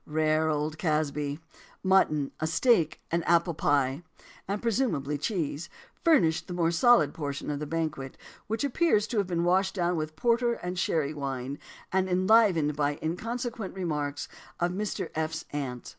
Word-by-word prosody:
Rare 155 +1 +1
old 155 +1 -2
Casby! 150 -2 -1 0.4
"Mutton, 170 -7 +3
a 155 - 0
steak, 160 - +2
and 170 +1 +1
an - - -5
apple 170 0 +3
pie" 140 -1 +1 0.5
and 200 +2 -2
presumably 220 - 0
cheese 160 -1 -2 0.3
furnished 180 - +3
the 180 - -5
more 170 -1 +2
solid 170 - +4
portion 145 -1 -4
of 145 - -3
the 150 - -4
banquet, 155 -4 -3 0.3
which 225 +3 -2
appears 280 -6 +2
to 230 - -1
have 200 - 0
been 170 -2 0
washed 190 +2 +2
down 175 -1 +1
with 155 -1 -3
porter 235 +5 +2
and 180 -4 -4
sherry 155 -3 0
wine, 135 -1 -4 0.3
and 190 0 +1
enlivened 185 -5 +4
by 145 0 +1
the - - -9
inconsequent 230 +5 -3
remarks 150 -6 -3 0.3
of 175 0 +1
"Mr. 205 +3 -3
F.'s 160 0 -3
Aunt." 130 -4 -4
165 Hz, 160 wpm, -28 LUFS, 150-190 Hz, 0.5 s, solid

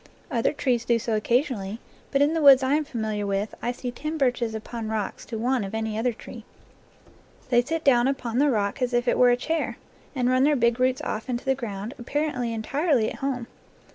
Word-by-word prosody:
Other 230 -3 +1
trees 255 -5 0
do 235 -1 +2
so 230 -1 -1
occasionally, 225 -3 0 0.3
but 280 0 +3
in 295 +2 +2
the 325 - 0
woods 275 -2 +8
I 260 +2 +2
am 305 0 +1
familiar 215 -5 -3
with 200 +2 -1
I 240 - -1
see 245 0 -5
ten 305 +6 -4
birches 245 -5 0
upon 220 +1 -5
rocks 215 -2 -3
to 225 +1 -5
one 245 +1 0
of 195 +2 -5
any 220 -1 -2
other 235 +3 +1
tree. 225 - -11 1.1
They 240 -1 +5
sit 325 +6 -3
down 245 -2 +4
upon 250 -3 -1
the 290 +1 +4
rock 210 0 -1
as 250 0 0
if 240 +1 +1
it - - +3
were 250 - +7
a 245 - +3
chair, 320 +5 -2 0.4
and 250 -2 +1
run 255 +1 +3
their 295 +1 +4
big 235 -1 +2
roots 255 0 +1
off 220 +4 -4
into 245 +1 -3
the 270 - +3
ground, 220 -3 -5
apparently 255 -1 -2
entirely 250 +2 0
at - - -8
home. 265 -3 -2
245 Hz, 215 wpm, -25 LUFS, 225-270 Hz, 1.1 s, woods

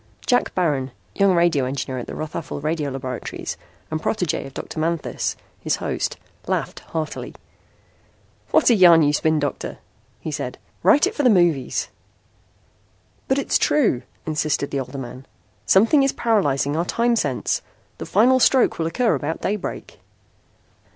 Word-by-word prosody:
Jack 245 -2 +1
Baron, 145 -7 0 0.2
young 195 - +3
radio 170 -6 +3
engineer 130 0 -3
at 120 - -7
the - - -6
Rothafel 155 -1 -5
Radio 155 0 -1
laboratories, 130 -2 -5 0.4
and 155 0 -2
protégé 180 -9 -1
of 135 - -13
Dr. - - -6
Manthis, 165 0 -1 0.2
his - - 0
host, - - -3 0.3
laughed - - -2
heartily. 160 -1 -5 1.1
"What - - +4
a - - +7
yarn 175 -6 +7
you 145 0 +3
spin, 160 +1 +2
Doctor," 145 -1 -3 0.4
he - - -5
said. - - -4 0.2
"Write 290 - +5
it - - -2
for - - -1
the 255 - +5
movies." 175 - +2 1.4
"But 265 - +2
it's 280 - +1
true," 235 - +2 0.2
insisted 155 -2 -1
the 140 - -1
older 130 +1 -6
man. 130 0 -8 0.4
"Something 225 +9 +5
is 270 0 +2
paralyzing 145 - +1
our 170 +2 0
time 235 +5 +1
sense. 140 - -1 0.4
The - - -6
final 250 +6 +4
stroke 260 -5 +3
will 160 - 0
occur 230 +7 +1
about 160 +2 -2
daybreak." 205 0 -4
160 Hz, 150 wpm, -22 LUFS, 140-210 Hz, 1.4 s, a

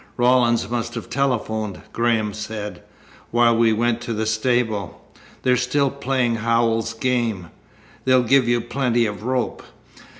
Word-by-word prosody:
"Rawlins 120 -1 +3
must 120 0 -3
have - - -7
telephoned," 110 -6 -1
Graham 115 -3 +1
said, 105 -1 -6 0.5
"while 120 0 +4
we 115 0 +4
went 120 +1 0
to 120 -1 -4
the 110 0 -2
stable. 110 -2 0 0.4
They're 125 -1 +4
still 130 +2 +1
playing 130 -4 0
Howells's 115 0 +1
game. 115 -8 -1 0.5
They'll 130 -1 +4
give 130 +1 +3
you 120 0 +2
plenty 120 -1 0
of 105 -2 -4
rope." 125 +2 -2
120 Hz, 135 wpm, -22 LUFS, 110-125 Hz, 0.5 s, while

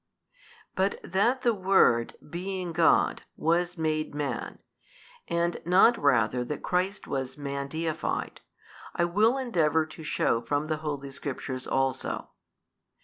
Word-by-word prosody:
But 190 +1 0
that 235 +8 +1
the 240 -2 +4
Word, 185 - +3
being 180 +1 -4
God, 165 0 +3 0.2
was 175 +2 +1
made 155 -2 -1
Man, 145 -1 -3 0.7
and 170 0 0
not 185 +8 +5
rather 125 - +2
that 145 +4 -5
Christ 185 +3 -1
was 130 -1 -4
Man 140 -1 -4
deified, 160 +2 -3 0.5
I 175 - +2
will 215 +9 +3
endeavour 160 - +1
to 155 +1 -12
shew 115 -6 +1
from 145 +1 0
the 155 0 -1
Holy 145 -3 -4
Scriptures 135 -2 -5
also. 135 -1 -1
160 Hz, 125 wpm, -28 LUFS, 140-185 Hz, 0.7 s, not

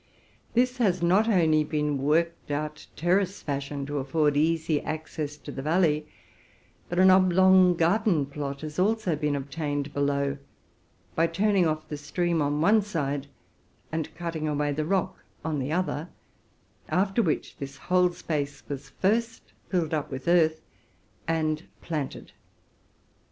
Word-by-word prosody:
This 250 +1 +2
has 185 -7 +2
not 190 +6 +4
only 160 -6 +4
been 150 -2 -1
worked 165 +5 0
out 150 +1 -4
terrace 185 +4 +1
fashion, 140 -1 -3
to 145 +1 -3
afford 145 +2 +1
easy 160 0 +1
access 155 -1 -5
to 145 - -9
the 135 - -5
valley, 155 -1 +2 0.8
but 175 - -3
an 185 +1 +7
oblong 185 0 +5
garden 170 -2 +2
plot 140 0 -5
has 155 +1 -5
also 205 -3 +1
been 150 -1 -1
obtained 145 0 -3
below, 140 0 0 0.7
by 165 +1 +2
turning 190 +1 +2
off 155 0 -2
the 150 - -5
stream 170 +3 -1
on 145 +1 0
one 210 +6 +5
side, 145 -8 -3 0.6
and 160 -1 -3
cutting 165 -2 -3
away 150 -1 0
the 150 +2 -2
rock 190 +1 0 0.3
on 155 -2 -1
the 135 +2 -2
other, 175 -1 -1 0.8
after 195 +4 +2
which 165 -8 -1
this 140 0 -7
whole 180 +4 +2
space 150 -4 -4
was 140 -2 -6
lastly 230 +4 0 0.2
filled 170 -4 0
up 150 -2 0
w 130 - -6
ith 130 +3 -9
earth 160 -2 +3 0.7
and 155 -1 -1 0.2
planted. 150 -5 -4
155 Hz, 145 wpm, -27 LUFS, 145-180 Hz, 0.8 s, an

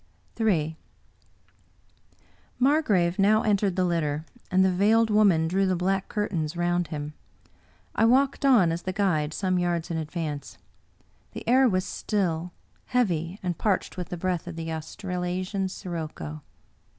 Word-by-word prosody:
Ill 165 -9 +1 1.8
Margrave 215 - +2
now 215 +2 +4
entered 200 -3 +1
the 185 -1 +2
litter, 155 -3 -1 0.2
and 190 0 +4
the 190 - +3
Veiled 220 +4 +3
Woman 195 -7 +4
drew 190 +3 +1
the 185 - +1
black 190 +2 -1
curtains 170 -6 -2
round 175 0 +1
him. 150 -2 -5 0.8
I 225 - +3
walked 270 +4 +3
on, 235 -12 +5
as 165 +1 -3
the 185 - -4
guide, 175 -7 +1
some 185 +2 0
yards 175 -1 -1
in 165 - -1
advance. 155 -2 -5 0.8
The - - -8
air 255 +2 +5
was 185 -2 0
still, 180 -4 -2 0.3
heavy, 180 -8 0
and 175 -2 -2
parched 200 -4 0
with 180 -1 -5
the 180 - -4
breath 180 -1 -2
of 175 - -6
the 165 0 -4
Australasian 180 +3 -3
sirocco. 155 - -6
180 Hz, 140 wpm, -26 LUFS, 165-200 Hz, 1.8 s, on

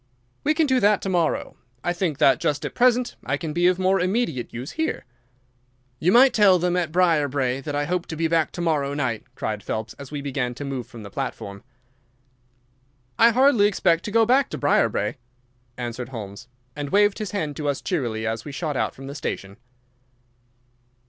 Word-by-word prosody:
"We 305 +1 +2
can 320 0 +3
do 260 -3 +2
that 205 -2 +4
to 195 - -2
morrow. 175 -4 0 0.3
I 175 - 0
think 175 -5 -1
that 135 -3 +4
just 145 -1 -1
at - - -4
present 250 0 +2
I - - -1
can 160 -3 -5
be 175 +2 +3
of 180 0 +3
more 190 +1 +2
immediate 185 - -1
use 125 +4 -6
here." 320 0 -2 0.9
"You 180 - +2
might 255 +4 +6
tell 200 -4 +6
them 180 0 0
at 175 -3 0
Briarbrae 145 -7 +1
that 145 +1 -4
I 145 0 0
hope 175 +2 -2
to 160 - -5
be 165 +1 0
back 165 -1 +1
to 175 - -5
morrow 145 -4 0
night," 125 -6 -2
cried 105 -1 -3
Phelps, 110 +2 -4
as 140 -1 -9
we 150 - -5
began 135 -3 -3
to 145 - -6
move 135 -4 -4
from 115 -2 -11
the 100 - -10
platform. 100 +1 -5 1.6
"I 230 - +8
hardly 245 -3 +4
expect 170 -4 +1
to 210 - -4
go 225 +1 +4
back 260 +4 +3
to - - -5
Briarbrae," - - +1 0.6
answered 120 0 -5
Holmes, 110 -1 -8 0.3
and 145 -1 -4
waved 205 +2 +3
his 215 -3 -3
hand 155 -7 -3
to 150 -2 -3
us 140 - -1
cheerily 120 - -2
as 115 0 -2
we 145 - -7
shot 150 0 -3
out - - -1
from 135 - -10
the 140 - -6
station. 100 -8 -5
155 Hz, 195 wpm, -24 LUFS, 130-195 Hz, 1.6 s, I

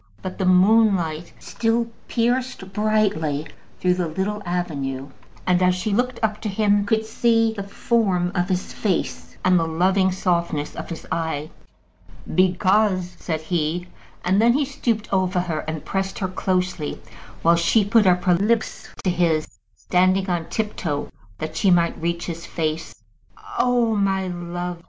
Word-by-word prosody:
But 185 +1 -6
the 190 - +1
moonlight 185 -4 +3
still 230 +1 0 0.2
pierced 240 -4 -1
brightly 205 -9 +1 0.3
through 180 -1 +3
the 180 -1 -1
little 195 +6 -2
avenue, 140 -6 -3 0.4
and 180 -1 +3
she, 185 - +3
as 180 0 +3
she 200 +3 -2
looked 245 +2 0
up 215 -1 0
to 215 - -2
him, 205 0 +2
could 220 0 +1
see 225 0 +2
the 205 - -5
form 195 -3 0
of 180 0 0
his 185 0 -2
face 195 -5 -2
and 185 -1 +5
the 165 - 0
loving 185 +3 +2
softness 170 -5 -1
of - - -6
his 165 - -7
eye. 160 -2 -2 0.8
"Because 185 +1 +2
," - - -26
said 160 -2 -3
he; 170 +2 -2 0.4
and 190 +3 +3
then 235 +1 +5
he 285 +2 +2
stooped 235 -5 -2
over 185 -1 +2
her 170 -3 -2
and 155 -1 -4
pressed 195 0 -2
her 190 - -1
closely, 185 -4 -1 0.4
while 170 +1 +6
she 195 +5 +3
put 215 0 +4
up 180 0 +3
her 180 -1 +4
lips 215 +6 0
to 185 - +2
his, 165 -3 +1 0.3
standing 185 +2 +2
on 175 -3 -1
tip 215 -1 -2
toe 145 -4 -3 0.3
that 155 +6 -5
she 195 +4 +2
might 170 -2 +2
reach 170 +1 -1
to - - -3
his 170 +1 -8
face. 160 0 -3 0.6
"Oh, 240 -5 +3
my 195 -2 +1
love!" 175 0 -5
185 Hz, 165 wpm, -23 LUFS, 170-210 Hz, 0.8 s, while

